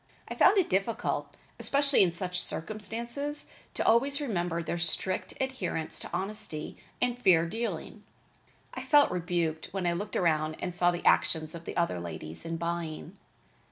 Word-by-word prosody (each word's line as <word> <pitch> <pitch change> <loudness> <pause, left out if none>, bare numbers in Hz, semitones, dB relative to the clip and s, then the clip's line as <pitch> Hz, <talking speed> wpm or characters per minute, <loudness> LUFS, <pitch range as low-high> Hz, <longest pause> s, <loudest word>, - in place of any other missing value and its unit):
I - - -4
found 405 - +5
it 380 - +4
difficult, 195 +5 -1 0.2
especially 280 0 +3
in 180 -3 +5
such 180 +1 -3
circumstances, 235 - -4 0.3
to - - -1
always 275 +5 +4
remember 175 - -1
their 170 +2 -3
strict 175 +2 0
adherence 260 -11 -2
to - - -6
honesty 190 -4 -2 0.2
and 245 0 0
fair 175 -8 +5
dealing. 225 +7 -4 0.7
I - - -5
felt 295 -2 +5
rebuked 170 -3 -1
when 190 -2 -2
I 175 - +2
looked 205 +5 -4
around 155 -2 +2
and 180 - -3
saw 175 0 +3
the 175 0 -3
actions 155 -1 +3
of 170 0 -9
the - - -6
other 170 - +1
ladies 80 - -7
in 165 0 -2
buying. 170 +1 -4
180 Hz, 160 wpm, -29 LUFS, 165-230 Hz, 0.7 s, found